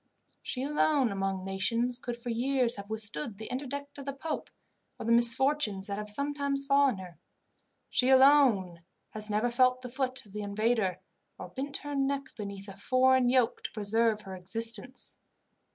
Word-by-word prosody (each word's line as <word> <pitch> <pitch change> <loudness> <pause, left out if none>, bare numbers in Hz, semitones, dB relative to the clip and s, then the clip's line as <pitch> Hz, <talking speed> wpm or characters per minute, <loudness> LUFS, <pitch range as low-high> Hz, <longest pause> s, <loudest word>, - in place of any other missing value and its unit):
"She 255 - -4
alone 290 -3 +2
among 195 -1 -2
nations 230 +6 0
could 240 -1 -5
for 240 0 -5
years 250 0 +1
have 200 +1 -8
withstood 210 -3 -3
the 220 - -8
interdict 280 +2 -5
of 275 - -8
the 275 - -3
pope, 300 +3 -5 0.5
or - - -7
the 230 - +1
misfortunes 235 -3 +3
that 200 0 -4
have 210 0 -5
sometimes 280 +3 0
befallen 275 -4 +3
her. 180 -2 -10 0.7
She 255 - +2
alone 260 -10 +5 0.3
has 215 0 -4
never 215 +3 +1
felt 255 +1 +3
the 250 - -6
foot 260 0 -3
of 205 - -18
the 210 - -4
invader, 210 -1 0 0.4
or - - -8
bent 280 +1 -4
her 290 - -4
neck 275 0 -1
beneath 200 -1 -7
a 195 - -9
foreign 255 +4 +3
yoke 250 -2 +2
to - - -5
preserve 220 +1 +1
her 190 -2 -8
existence. 225 +6 -3
240 Hz, 170 wpm, -30 LUFS, 205-270 Hz, 0.7 s, alone